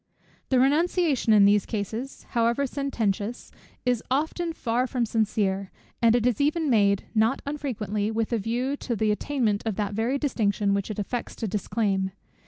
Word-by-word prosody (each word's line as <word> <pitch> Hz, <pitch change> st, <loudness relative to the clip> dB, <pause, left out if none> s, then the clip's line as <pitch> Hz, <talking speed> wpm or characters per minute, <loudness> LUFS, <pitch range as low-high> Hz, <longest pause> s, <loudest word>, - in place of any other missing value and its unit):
The 260 Hz, -, +3 dB
renunciation 295 Hz, -1 st, +2 dB
in 205 Hz, -2 st, +7 dB
these 205 Hz, -1 st, +4 dB
cases, 225 Hz, +5 st, -4 dB
however 235 Hz, +3 st, +1 dB
sententious, 235 Hz, -6 st, -2 dB, 0.3 s
is 245 Hz, -2 st, +2 dB
often 320 Hz, +5 st, 0 dB
far 245 Hz, -4 st, -1 dB
from 245 Hz, -2 st, 0 dB
sincere; 200 Hz, -3 st, 0 dB, 0.3 s
and 230 Hz, 0 st, +5 dB
it 240 Hz, -1 st, +1 dB
is 250 Hz, +2 st, +1 dB
even 305 Hz, 0 st, +1 dB
made 200 Hz, -3 st, +3 dB
not 225 Hz, +4 st, +2 dB
unfrequently, 225 Hz, -8 st, -2 dB
with 225 Hz, +1 st, -1 dB
a 230 Hz, -, +2 dB
view 245 Hz, +6 st, -1 dB
to 240 Hz, -, -3 dB
the 215 Hz, 0 st, +1 dB
attainment 215 Hz, -2 st, 0 dB
of 220 Hz, -3 st, -2 dB
that 205 Hz, 0 st, -2 dB
very 230 Hz, +6 st, 0 dB
distinction 210 Hz, -8 st, 0 dB
which 200 Hz, +1 st, -1 dB
it 215 Hz, -, -4 dB
affects 230 Hz, +4 st, -4 dB
to 225 Hz, -, -3 dB
disclaim. 195 Hz, -2 st, -1 dB
230 Hz, 165 wpm, -26 LUFS, 205-265 Hz, 0.3 s, in